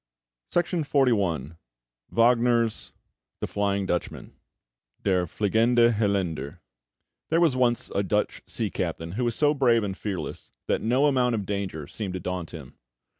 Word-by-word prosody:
[Illustration: 175 -1 +1 1.3
WAGNER] 120 0 +3 0.7
THE - - -2
FLYING 100 -1 0
DUTCHMAN 90 -2 -3 0.7
(Der 90 -3 +2
Fliegende 115 +5 +3
Holländer) 95 -7 -1 0.7
There 165 - +3
was 165 -6 +3
once 120 -2 +1
a 100 - +1
Dutch 105 +2 -1
sea - - -2
captain 80 +1 -3
who 120 +6 -1
was 120 -1 0
so 150 +2 +3
brave 120 -5 +3
and 95 -2 -3
fearless 100 -2 -5
that - - 0
no 125 +5 +2
amount 125 -4 +2
of 105 -3 -3
danger 95 -6 -3
seemed 95 +3 -5
to - - -3
daunt 90 -2 -4
him. 70 -6 -11
105 Hz, 135 wpm, -26 LUFS, 95-120 Hz, 1.3 s, WAGNER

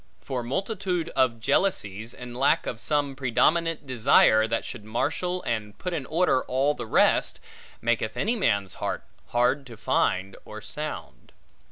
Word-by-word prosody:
For 125 - -4
multitude 180 - -2
of 125 -7 +1
jealousies, 110 - 0
and 125 -1 -9
lack 135 +3 +2
of 115 - -4
some 145 -1 0
predominant 155 +5 +1
desire, 115 -3 +4
that 115 0 -1
should 120 -5 -7
marshal 180 - -2
and 105 -3 -3
put 180 -1 -4
in 145 -6 -3
order 165 -5 +2
all 135 +3 +1
the 115 - -7
rest, - - +3 0.4
maketh 115 -1 0
any 220 - +1
man's 100 - 0
heart, - - -2 0.2
hard 125 +4 +1
to 115 -2 -11
find 95 -1 0
or 110 - -9
sound. 110 - -6
125 Hz, 150 wpm, -26 LUFS, 110-155 Hz, 0.4 s, desire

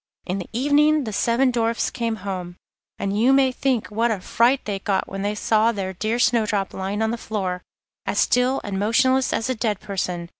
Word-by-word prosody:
In 185 +2 -2
the 180 - -7
evening 290 +4 +3
the 220 -4 -5
seven 240 +5 +2
Dwarfs 230 -1 0
came 230 -2 -2
home, 180 -3 -4 0.4
and 195 0 -2
you 250 +3 +5
may 270 -1 +4
think 255 -4 -1
what 230 +3 +1
a 215 -4 -1
fright 240 +8 +2
they 200 -2 -3
got 195 0 -1
when 195 0 -5
they 205 +1 -1
saw 220 +1 +2
their 195 -3 -4
dear 215 +5 -1
Snowdrop 215 -5 +1
lying 195 +3 -2
on 220 - 0
the 235 - -4
floor, 185 -5 -3 0.5
as - - -1
still 250 +2 +2
and 195 -2 -3
motionless 260 +5 +2
as 225 - -1
a 260 - 0
dead 215 -4 -1
person. 180 -4 -4
220 Hz, 200 wpm, -23 LUFS, 195-250 Hz, 0.5 s, you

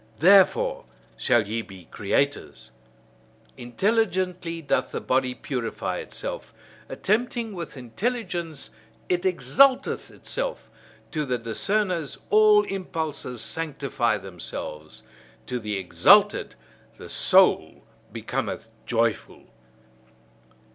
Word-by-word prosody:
Therefore 190 +3 +4 0.3
shall 105 - +2
ye 115 +2 -2
be 95 -5 -13
creators! 140 - -2 0.8
Intelligently 180 - -1
doth 145 -4 0
the - - -4
body 130 -1 0
purify 125 -3 -4
itself; - - -6 0.3
attempting 230 +1 -1
with 170 -5 -7
intelligence 170 - -4 0.4
it 180 +1 +1
exalteth 260 +8 +3
itself; - - -5 0.4
to 155 -2 -1
the 125 -3 -1
discerners 165 - -1
all 425 -1 +6
impulses 160 - -4
sanctify 140 -6 -1
themselves; 85 -5 -7 0.4
to 125 - -3
the 105 -3 -3
exalted 95 -2 +4 0.4
the - - -10
soul - - +3 0.3
becometh 115 - -4 0.2
joyful. 115 -2 -1
150 Hz, 90 wpm, -25 LUFS, 115-195 Hz, 0.8 s, all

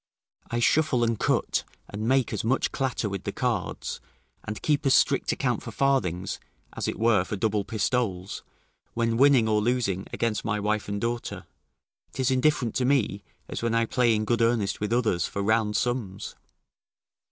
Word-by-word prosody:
I 120 - -2
shuffle 130 0 +3
and 115 -2 0
cut - - +1 0.2
and 110 +2 -4
make 130 -1 +2
as - - -2
much 125 +4 +1
clatter 130 -5 -1
with 100 -2 -4
the - - -3
cards, - - -2 0.4
and 105 0 -5
keep 150 -1 +1
as 130 - +5
strict - - +3
account - - -1
for - - -7
farthings, 95 -10 0 0.3
as - - -3
it - - -2
were 110 -4 +3
for 105 - -4
double 105 0 0
pistoles; 105 -4 -1 0.5
when 115 -1 +1
winning 130 -2 +5
or 105 -1 +2
losing 105 -5 0
against 115 -3 -1
my 105 -2 -1
wife 105 0 -1
and 100 0 -2
daughter, 120 +2 -3 0.7
'tis 130 0 0
indifferent 130 -3 +2
to 130 - +1
me, 125 -7 +1 0.3
as - - -5
when 115 0 0
I 115 0 +3
play 120 -1 +2
in 110 0 -1
good 120 +1 +1
earnest 115 -3 +1
with 105 +1 -2
others, 110 -8 +1
for 100 - -3
round 110 0 +2
sums. 120 -6 -2
115 Hz, 175 wpm, -26 LUFS, 105-125 Hz, 0.7 s, as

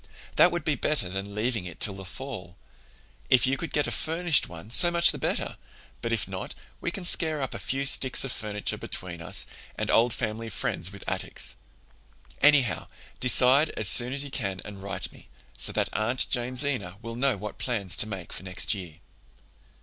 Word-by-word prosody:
That - - +6
would - - -3
be - - +2
better - - +1
than 95 +2 -5
leaving 110 -2 -1
it 90 -3 -8
till 100 - 0
the 95 0 -9
fall. 95 -5 -8 0.7
If 130 - +5
you 130 +1 +2
could 165 - -6
get 150 - +1
a - - -2
furnished 165 -1 +1
one 85 +6 -10
so 175 +8 +6
much 170 0 +5
the - - -7
better, - - -2 0.4
but 115 - -2
if 115 -3 +1
not, 95 -1 -6 0.2
we - - -2
can 180 +1 -5
scare 160 -3 +3
up 135 -2 -3
a - - -5
few 135 +1 -2
sticks 130 -1 +6
of 135 - -3
finiture 105 -2 -2
between 85 -2 -5
us - - 0 0.3
and - - -1
old 120 +2 +4
family 115 0 -3
friends 90 -2 -3
with 100 -1 -11
attics. - - -2 0.9
Anyhow, 135 - +4 0.3
decide 130 +4 +4
as 105 - 0
soon 120 +4 +5
as 140 +1 -1
you 140 - -8
can 100 -8 -2
and 100 -2 -9
write 100 -1 -2
me, - - -17 0.3
so - - -3
that - - -1
Aunt 120 +4 +1
Jamesina 125 -6 -1
will 115 +1 -6
know 130 -2 +1
what 105 +1 -7
plans 100 -8 0
to 105 - +7
make 95 -5 -6
for - - -4
next 95 +3 0
year." 90 -6 -7
115 Hz, 195 wpm, -27 LUFS, 95-135 Hz, 0.9 s, to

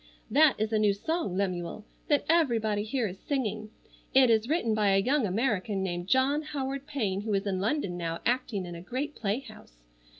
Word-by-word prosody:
"That 300 -1 +5
is 215 +1 -1
a 215 - +3
new 210 -1 +4
song, 315 - -2
Lemuel, 185 +1 -2 0.2
that 290 -2 +2
everybody 230 -11 +2
here 230 +1 -1
is 190 0 -8
singing. 215 -6 -2 0.5
It 260 -3 +7
is 225 +2 +2
written 300 -9 +1
by 205 -2 +3
a - - +5
young 255 +4 +2
American 205 -1 0
named 175 -1 -3
John 265 +6 +3
Howard 275 -2 -4
Payne 205 -9 -1
who 210 -1 -1
is 195 +1 -1
in 190 -2 -1
London 205 -5 -1
now 165 -1 -3
acting 240 -6 0
in 175 - -7
a 170 - -8
great 260 - -4
playhouse. 215 - -5
215 Hz, 190 wpm, -29 LUFS, 195-270 Hz, 0.5 s, It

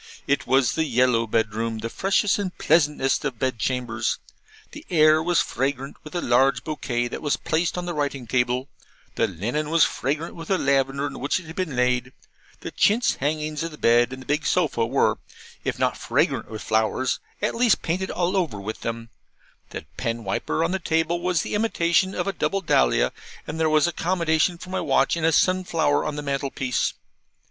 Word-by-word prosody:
It 140 - 0
was 130 -3 +3
the 160 - 0
yellow 125 -3 +2
bedroom, 110 +1 -1
the 110 +1 -4
freshest 195 - +1
and 190 -3 -4
pleasantest 150 -4 +2
of 135 -5 -3
bed 130 -1 -1
chambers; 120 -2 -1 0.5
the - - -10
air 155 -2 +5
was 175 +1 +2
fragrant 135 +1 -3
with 155 - -10
a 175 - 0
large 130 +3 +3
bouquet 120 -6 -2
that - - -6
was 145 -2 0
placed 165 +3 -1
on 180 - -3
the 175 - -3
writing 140 -4 -2
table; 125 +2 0 0.5
the - - +1
linen 120 - -3
was 165 0 +4
fragrant 150 +5 -1
with 165 -1 -9
the 190 - +2
lavender 140 -1 +1
in 145 - -5
which 140 +7 0
it 185 - -13
had 160 +1 -10
been 180 -8 -2
laid; 125 0 +1 0.5
the - - -6
chintz 225 +4 +2
hangings 150 +2 -2
of 165 - -2
the 150 - -12
bed 120 0 +3
and 130 0 -7
the - - -21
big 150 +2 0
sofa 145 -10 +1
were, 135 +4 +1 0.4
if - - -2
not - - +1
fragrant - - 0
with 110 -1 -7
flowers, 110 +4 0 0.2
at 210 - 0
least 235 -2 +2
painted 185 +3 -1
all 180 +2 -1
over 165 - -1
with 105 +3 -6
them; 115 0 -4 0.6
the - - -7
pen 115 0 -2
wiper 95 +10 -1
on 165 - 0
the 190 - -1
table 165 0 0
was 180 -1 +1
the - - -5
imitation 190 -3 +1
of - - -1
a 195 - -1
double 195 +2 -1
dahlia; 65 - +2 0.3
and 155 +2 -5
there 160 -1 +2
was 155 -1 +4
accommodation 170 -1 +1
for 185 +2 -10
my 190 - -1
watch 135 +1 +2
in 170 - -4
a 165 - +4
sun 185 +4 +3
flower 160 -4 +1
on 150 - -3
the 150 - -5
mantelpiece. 135 -2 -1
150 Hz, 195 wpm, -24 LUFS, 125-170 Hz, 0.6 s, air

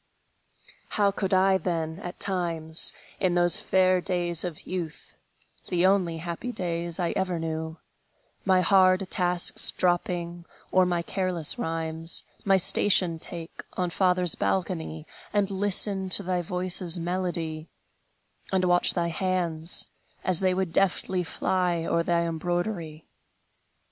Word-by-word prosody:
How 200 -1 +3
could 195 0 -3
I, 190 0 +3
then, 165 -2 -3
at 180 -2 -8
times, 165 -4 0 0.3
In 185 -3 +1
those 175 0 +4
fair 185 -1 +2
days 175 -2 -1
of 175 -4 -6
youth, 170 -4 -6 0.5
The 180 0 +1
only 185 -4 +2
happy 170 +9 -5
days 170 -4 -3
I 175 -2 0
ever 185 -2 -1
knew, 160 0 -4 0.7
My 185 -2 +3
hard 185 +1 +4
tasks 180 -1 +5
dropping, 175 -1 -1 0.3
or 185 -1 +4
my 175 -1 -1
careless 180 -4 -1
rhymes, 165 0 -2 0.2
My 195 -1 +4
station 180 -2 +2
take, 165 0 -7
on 180 -2 -2
father's 180 -2 +2
balcony, 165 -4 -2 0.3
And 200 -1 +1
listen 195 0 +1
to - - +2
thy 180 0 -1
voice's 180 0 0
melody, 170 -2 -3 0.8
And 190 -1 +1
watch 175 0 +3
thy 170 -2 0
hands, 170 -2 +1 0.4
as 185 -2 +4
they 185 -1 +1
would 185 -3 -2
deftly 190 -1 +1
fly 175 0 -1
O'er 170 - +1
thy 170 0 +1
embroidery! 170 -1 -3
175 Hz, 130 wpm, -26 LUFS, 165-185 Hz, 0.8 s, tasks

